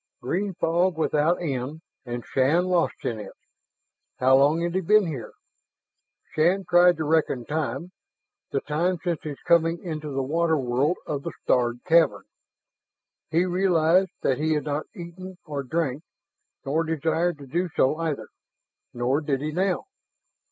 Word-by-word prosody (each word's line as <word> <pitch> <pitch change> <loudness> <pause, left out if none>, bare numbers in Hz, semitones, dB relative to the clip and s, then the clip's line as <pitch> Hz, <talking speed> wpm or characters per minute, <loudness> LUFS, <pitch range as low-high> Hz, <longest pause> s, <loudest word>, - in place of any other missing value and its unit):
Green 180 +9 -2
fog 170 +2 +1
without 160 +1 +2
end, 140 +1 -3 0.3
and 120 0 -5
Shann 145 +7 +2
lost 180 -2 0
in 115 -2 -2
it. 105 - -8 0.8
How 130 +1 +5
long 145 +5 +4
had 170 0 -1
he 190 - +1
been 210 +3 +4
here? 145 -8 -6 1.0
Shann 180 +5 +2
tried 175 0 +5
to 160 - -2
reckon 150 -5 +1
time, 150 +3 -3 0.6
the 135 - -1
time 170 +5 0
since 175 -3 -1
his 150 -3 -6
coming 165 0 +3
into 155 -4 -5
the 135 -1 -2
water 160 +3 +1
world 135 +6 0
of 145 -2 -3
the - - -5
starred 120 -1 +1
cavern. 165 -2 +3 1.1
He 165 +3 +2
realized 180 0 +3
that 130 - +1
he 155 +1 +1
had 150 - -1
not 150 0 -3
eaten, 185 +1 -9
nor 145 -2 -3
drank, 140 0 -2 0.6
nor 155 +4 +1
desired 160 +1 0
to 140 - -11
do 175 +7 -1
so 135 +4 +2
either 160 -4 -3 0.7
nor 125 +5 +1
did 145 -3 -1
he 150 +2 -3
now. 185 - 0
160 Hz, 150 wpm, -25 LUFS, 140-175 Hz, 1.1 s, How